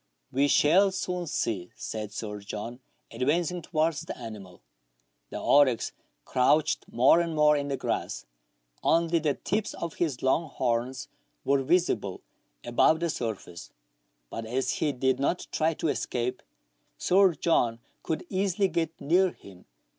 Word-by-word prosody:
" - - -49
We 140 +2 +2
shall 175 +8 +5
soon 180 -2 -3
see," 95 - -2
said 105 -2 -5
Sir 105 -2 -5
John, 105 +4 -6 0.3
advancing 160 +8 0
towards 160 -1 0
the 165 - -7
animal. 105 - -10 0.7
The - - -5
oryx 135 -5 +3 0.3
crouched 135 +4 +2
more 130 +8 +5
and 165 -2 -3
more 150 0 +5
in 145 -1 -1
the 140 -1 -2
grass; - - -3 0.6
only 165 0 +2
the 150 -3 0
tips 210 +2 -2
of 170 -2 -5
his 150 -8 -1
long 155 +4 +2
horns 125 0 -2 0.4
were 140 0 +3
visible 135 - 0 0.4
above 140 +6 +3
the 170 -1 0
surface; 105 -9 -5 0.6
but 115 - -4
as 125 +4 -1
he 150 - 0
did 130 0 0
not 155 +6 0
try 160 +1 +1
to 160 - -1
escape. 125 -3 -2 0.6
Sir 190 -2 +4
John 120 -8 +1 0.2
could 160 - -3
easily 195 0 +1
get 165 -1 -2
near 180 +5 +3
him. 95 -2 -15
145 Hz, 145 wpm, -28 LUFS, 120-170 Hz, 0.7 s, shall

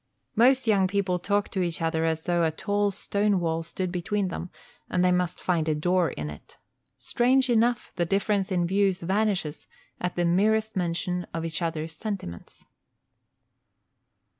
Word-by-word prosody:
Most 255 +3 +4
young 200 -4 +3
people 185 -2 0
talk 205 +3 0
to 190 - -2
each 170 -2 -1
other 165 -1 0
as 160 0 -1
though 175 -1 +1
a 160 - +3
tall 205 +5 0
stone 200 0 0
wall 165 -1 -1
stood 175 +2 -4
between 190 +2 -1
them 175 +1 -5 0.4
and 180 0 +2
they 180 - +4
must 180 -1 0
find 165 -3 0
a 155 - +2
door 175 +3 +2
in 75 - -5
it. 75 - -14 0.4
Strange 255 +1 +2
enough, 235 +1 +1
the 175 - +1
difference 195 +1 0
in 175 -2 +1
views 195 0 +1
vanishes 190 -4 -1 0.3
at 180 0 -2
the 175 - +1
merest 215 +5 +2
mention 180 0 -1
of 165 0 -2
each 165 +2 -2
other's 165 -1 -2
sentiments. 160 - -7
180 Hz, 165 wpm, -26 LUFS, 165-205 Hz, 0.4 s, Most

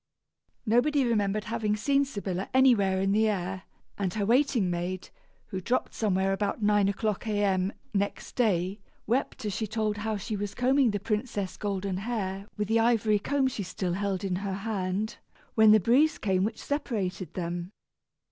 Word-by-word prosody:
Nobody 260 +5 +3
remembered 210 -3 +1
having 210 -1 -1
seen 280 +6 +2
Sybilla 195 -7 -4
anywhere 210 -8 +4
in 195 +1 +1
the 220 +2 +3
air, 190 -1 -3 0.3
and 190 -3 0
her 205 -2 0
waiting 240 -3 +3
maid, 175 +2 -3 0.4
who 190 - -4
dropped 245 +8 -1
somewhere 195 -3 +1
about 205 +2 -2
nine 205 -1 +4
o'clock 210 +2 -2
A.M., 200 -3 +1 0.2
next 200 0 -2
day, 195 -4 +1 0.3
wept 235 -1 -1
as 205 - -1
she 220 +1 -2
told 215 -1 -1
how 215 0 -2
she 215 +2 -4
was 205 0 -4
combing 260 +1 +3
the 205 -1 -1
princess' 210 -2 -2
golden 195 -2 -2
hair 200 -2 -3
with 210 -1 -1
the 225 +1 +3
ivory 225 -2 +3
comb 275 +5 +1
she 245 -5 -3
still 185 -1 -3
held 195 0 -2
in 185 -2 -1
her 195 0 -3
hand, 200 0 -2 0.4
when 220 -1 +6
the 215 - +7
breeze 285 - +3
came 190 - +1
which 220 +2 -1
separated 205 - -3
them. 175 0 -3
205 Hz, 165 wpm, -28 LUFS, 190-225 Hz, 0.4 s, the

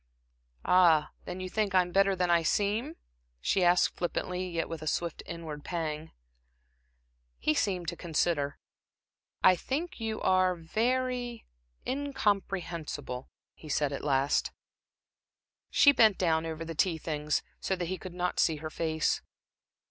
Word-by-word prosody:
"Ah, 165 -4 +5
then 180 +1 -5
you 185 - -4
think 200 0 -1
I'm 180 -1 +3
better 195 +1 +3
than 180 -1 +1
I 170 -1 +5
seem?" 210 - 0 0.4
she 185 - +1
asked, 175 0 +4
flippantly, 180 +1 -2
yet 165 -1 -2
with 165 -2 -6
a 155 - -6
swift 170 +1 -1
inward 160 -3 -6
pang. 160 -2 -4 1.3
He 155 - +1
seemed 180 0 0
to - - -5
consider. 160 -4 0 0.9
"I 185 - +7
think 290 - -3
you 220 -1 -3
are 185 -1 +3
very 245 +6 -1 0.4
incomprehensible," 195 - -2 0.2
he 155 - -13
said 145 0 +1
at - - -5
last. 140 -1 +1 1.2
She 285 - +7
bent 220 -7 +5
down 165 -2 +1
over 160 0 -5
the 165 - -5
tea 165 +1 +1
things, 150 -1 -1 0.2
so 190 - -1
that 180 -1 -3
he 185 +1 -4
could 185 -1 -8
not 180 0 -1
see 160 - +3
her 155 +1 -6
face. 160 -1 0
175 Hz, 140 wpm, -30 LUFS, 160-195 Hz, 1.3 s, I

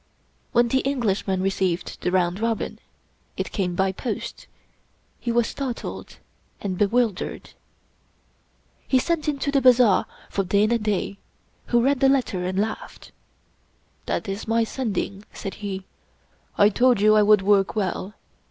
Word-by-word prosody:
When 240 0 +3
the 265 - +2
Englishman 210 -8 0
received 190 -2 -1
the - - 0
round 180 0 +1
robin 225 -1 -2 0.3
— - - -40
it - - -3
came 180 -4 -1
by 190 +1 +1
post 220 +4 -5 0.4
— - - -41
he 235 - -2
was 235 0 +3
startled 260 -2 -5 0.4
and 195 -2 -3
bewildered. 210 +1 0 1.4
He 260 - +3
sent 310 +3 0
into 280 -1 -1
the 275 -1 +2
bazaar 245 -6 +5 0.2
for 195 - -1
Dana 210 +5 +2
Da, 200 -2 -2 0.5
who 240 -1 +3
read 275 +1 +2
the 270 - +5
letter 245 -9 +1
and 185 +1 -2
laughed. 215 +2 -4 0.5
" - - -40
That - - -2
is 195 +3 -4
my 230 +1 +2
Sending," 215 -4 -3
said 195 - -6
he. 195 -2 -4 0.4
" - - -38 0.3
I 205 - +6
told 245 +1 +3
you 215 +1 +5
I 215 - +6
would 210 -1 +5
work 195 0 +3
well. 200 0 -2
210 Hz, 150 wpm, -24 LUFS, 195-240 Hz, 1.4 s, I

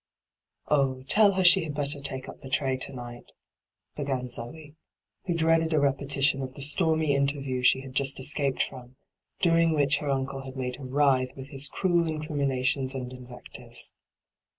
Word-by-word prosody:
' - - -66 0.3
Oh, 135 -3 +1
tell 205 +8 +5
her 190 0 +1
she 185 +2 +7
had 150 -2 -5
better 145 0 0
take 130 -2 -2
up - - -10
the 135 - -10
tray 135 0 0
to 130 - -3
night,' 120 -2 -10 0.6
began 135 -3 -3
Zee, 145 +6 -6 0.5
who 175 -2 -1
dreaded 165 0 +2
a 155 - +3
repetition 140 0 +1
of 130 -1 -6
the 140 - -5
stormy 160 0 +2
interview 140 -2 -1
she 125 +1 +4
had 135 -1 -10
just 135 +1 +1
escaped 140 0 +2
from, 125 -1 -10 0.5
during 165 -1 +3
which 145 -1 +2
her 145 - -4
uncle 135 0 -2
had 135 0 -9
made 125 -1 -4
her 140 - -9
writhe 130 -1 +1
with 135 0 -9
his 140 -1 +1
cruel 175 -2 +1
incriminations 140 -4 -1
and 125 -1 -5
invectives. 125 -1 -7
140 Hz, 175 wpm, -27 LUFS, 130-150 Hz, 0.6 s, she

